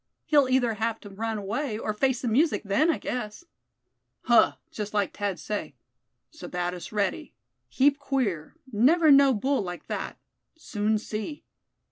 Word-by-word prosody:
He'll 285 -4 +4
either 250 -3 +2
have 225 +1 -2
to 205 - -11
run 220 +2 -3
away, 215 +4 -3
or 215 -1 -3
face 260 +3 0
the - - -1
music 285 +9 +2
then, 210 +11 +2
I 330 - +2
guess." 245 +5 -5 0.8
"Huh! 235 -1 +5 0.2
just 210 -1 -5
like 205 -2 0
Thad 200 -3 -2
say; 205 +7 -4 0.6
Sebattis 180 - -5
ready; 210 - -2 0.3
heap 280 +2 +3
queer; 240 - -2 0.2
never 305 +9 +5
know 275 -1 +7
bull 265 +4 0
like 175 -2 -6
that. - - -5 0.4
Soon 215 -8 -1
see!" 215 +7 -5
225 Hz, 145 wpm, -27 LUFS, 205-275 Hz, 0.8 s, know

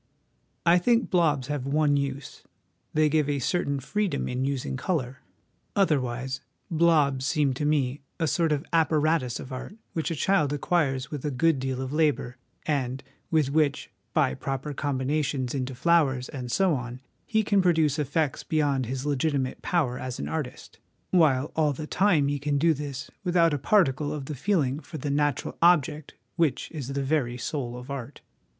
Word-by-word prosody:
I 175 +1 +6
think 235 +5 +2
blobs 155 -7 +2
have 140 -1 -3
one 145 0 +2
use 140 -1 -3 0.5
they 155 0 +3
give 150 -1 +1
a 145 - +1
certain 140 +1 0
freedom 185 +3 -1
in 125 +1 -1
using 135 -2 -2
colour. 130 -3 -2 0.6
Otherwise 130 -8 0
' - - -35
blobs 155 -5 +3
' - - 0
seem 150 -4 +2
to 145 +4 -3
me 145 -2 +1 0.2
a 165 - +1
sort 165 0 +1
of 145 -1 0
apparatus 155 -5 +2
of 130 - -8
art 130 +10 -7 0.2
which 160 +1 -1
a 165 - -2
child 150 -3 +2
acquires 145 -3 0
with 145 -4 -5
a 150 - 0
good 145 +2 +2
deal 130 0 -2
of 130 +2 -5
labour, 150 -5 +1 0.3
and 135 -3 -1 0.3
with 155 -4 +2
which, 150 -1 +1 0.2
by - - +2
proper 135 - -4
combinations 135 -1 -1
into 130 -1 -3
flowers, 135 -3 +2
and 125 -3 -6
so 185 +6 +3
on, 125 -2 -4 0.3
he 220 -1 +2
can 200 -1 +3
produce 160 -5 +2
effects 145 0 0
beyond 145 -5 0
his 130 +2 -4
legitimate 140 -2 -1
power 140 -8 0
as 130 -1 -5
an - - -4
artist, 150 -6 -5 0.3
while 150 -6 +3
all 150 -2 +2
the 150 +3 -6
time 175 -4 +3
he 145 0 -1
can 145 +1 0
do 165 +3 +4
this 140 -3 -6
without 170 -3 +3
a 145 - -1
particle 145 -4 +2
of 150 -3 -4
the 150 - -5
feeling 145 -3 0
for 160 0 -9
the 145 0 -3
natural 145 -2 -1
object 155 -3 +3 0.2
which 165 -5 0
is 145 -6 -5
the 140 0 -2
very 135 -4 0
soul 125 -1 -4
of 125 +3 -9
art. 135 0 -6
145 Hz, 175 wpm, -26 LUFS, 130-160 Hz, 0.6 s, I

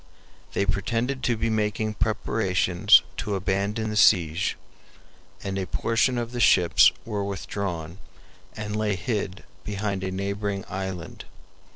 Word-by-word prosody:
They 100 - +1
pretended 115 +7 -1
to 120 -2 +1
be 115 +1 0
making 110 0 0
preparations 90 -3 +3
to 105 - -2
abandon 100 +3 -1
the - - -4
siege, 90 -3 +3 0.9
and 95 -1 -3
a 95 - -3
portion 115 +2 +1
of 120 -1 -3
the 125 - -4
ships 90 -6 +6
were 105 -3 -2
withdrawn 95 -3 -4 0.6
and 105 0 -4
lay 105 -2 0
hid 100 -1 -3 0.2
behind 100 -2 -3
a 95 - -1
neighboring 100 +1 -3
island. 95 -4 -6
100 Hz, 130 wpm, -25 LUFS, 95-110 Hz, 0.9 s, ships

